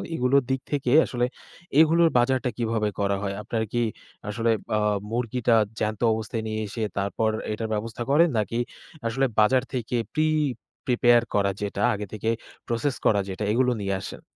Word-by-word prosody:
এগুলোর 130 +1 +3
দিক 130 0 0
থেকে 135 -4 0
আসলে 120 -1 0 0.5
এগুলোর 165 +1 +5
বাজারটা 130 +1 +2
কিভাবে 115 -3 0
করা 100 -1 +1
হয়? 100 -1 -2
আপনার 110 +1 -2
কি 120 - +2 0.5
আসলে 115 +2 +1 0.3
আ - - +2 0.3
মুরগিটা 120 0 +1 0.2
জ্যান্ত 105 0 -2
অবস্থায় 110 +1 -3
নিয়ে 110 0 -2
এসে 110 +2 -4
তারপর 100 +3 0 0.2
এটার 110 +1 -3
ব্যবস্থা 115 +2 -3
করেন, 165 +4 +5
নাকি 115 +3 -1 0.5
আসলে 135 +4 +1
বাজার 125 +4 +4
থেকে 125 -1 -2 0.2
প্রি-প্রিপেয়ার 130 -6 +2
করা 100 -1 +2
যেটা 100 0 -3
আগে 105 0 -4
থেকে 110 +1 -2 0.4
প্রসেস 120 +4 0
করা 105 - +4
যেটা, 95 +3 -4
এগুলো 125 +2 +3
নিয়ে 100 -1 -1
আসেন? - - -8
115 Hz, 155 wpm, -25 LUFS, 105-130 Hz, 0.5 s, এগুলোর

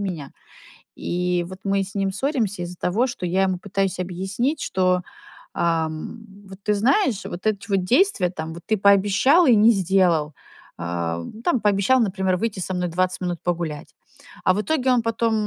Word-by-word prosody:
меня. 170 -8 -5 0.6
И 180 0 -1
вот 185 0 -9
мы 195 0 +1
с 195 +1 -11
ним 195 -1 0
ссоримся 230 - -1
из-за 175 +1 -7
того, 220 +11 +1
что 245 -7 -5
я 185 +2 +1
ему 185 -1 0
пытаюсь 195 0 -2
объяснить, 195 - -2
что, 185 -1 +1 0.5
ам, 165 +4 -1 0.3
вот 190 0 -12
ты 210 - +1
знаешь, 245 - +1
вот 180 +5 -5
эти 200 -2 -1
вот 195 -2 +1
действия, 245 - +2
там, 160 -2 -6
вот 170 - -10
ты 220 - +1
пообещал 200 - +4
и 245 - +6
не 215 +2 +6
сделал. 180 -6 +2 0.4
А 85 -1 -3 0.2
там, 255 -7 +1
пообещал, 205 +5 +3
например, 190 -4 0
выйти 210 -2 -2
со 185 - -3
мной 180 0 -1
20 185 +2 -1
минут 175 -2 -2
погулять. 170 -4 -3 0.5
А 185 - +4
в 205 - 0
итоге 265 0 +1
он 245 -1 +3
потом, 230 0 0
190 Hz, 175 wpm, -23 LUFS, 180-220 Hz, 0.6 s, и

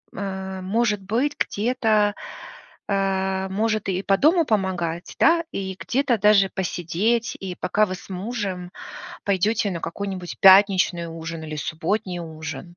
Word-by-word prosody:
э, 190 -1 -5
может 210 +1 0
быть, 240 +9 -1
где-то, 215 -2 +1 0.7
э, 190 -1 0
может 215 +1 -1
и 185 0 -1
по 195 -1 +2
дому 330 - +4
помогать, 180 - -2
да, 335 0 +4
и 190 -1 -4
где-то 260 -2 +1
даже 200 -2 +5
посидеть, 190 +6 -1
и 185 -2 -5
пока 205 +4 +1
вы 185 -2 -4
с 185 - -14
мужем 190 -2 -4 0.5
пойдёте 205 +2 +1
на 170 - -4
какой-нибудь 185 0 -5
пятничный 190 -3 +6
ужин 165 0 -6
или 155 -1 -6
субботний 180 +4 -2
ужин? 160 +2 -8
195 Hz, 130 wpm, -23 LUFS, 180-215 Hz, 0.7 s, пятничный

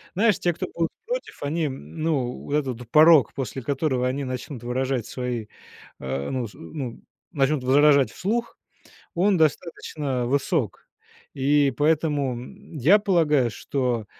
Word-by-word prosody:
Знаешь, 210 -1 +3
те, 175 -1 +1
кто - - -4
будут 165 -1 0 0.2
против, - - -5
они, 155 +2 0
ну, 130 - -3
вот 145 - -2
этот 125 -5 -3
порог, 155 -2 +6
после 135 0 -4
которого 130 -1 0
они 140 +2 -2
начнут 130 -1 -6
выражать 130 -1 -1
свои, 125 -4 -4 0.5
э, 65 +1 -3
ну, 125 -3 -2
с - - -16
ну, 125 - -7 0.3
начнут 140 -1 +1
возражать 140 +1 +5
вслух, 230 +5 -2 0.6
он 190 +2 +3
достаточно 150 -4 -1
высок. 140 - -1 0.5
И 140 +1 +3
поэтому, 150 -3 +1
м, 125 +5 -10
я 165 - +6
полагаю, 155 - +2
что, 125 -5 -2
140 Hz, 135 wpm, -24 LUFS, 125-155 Hz, 0.6 s, порог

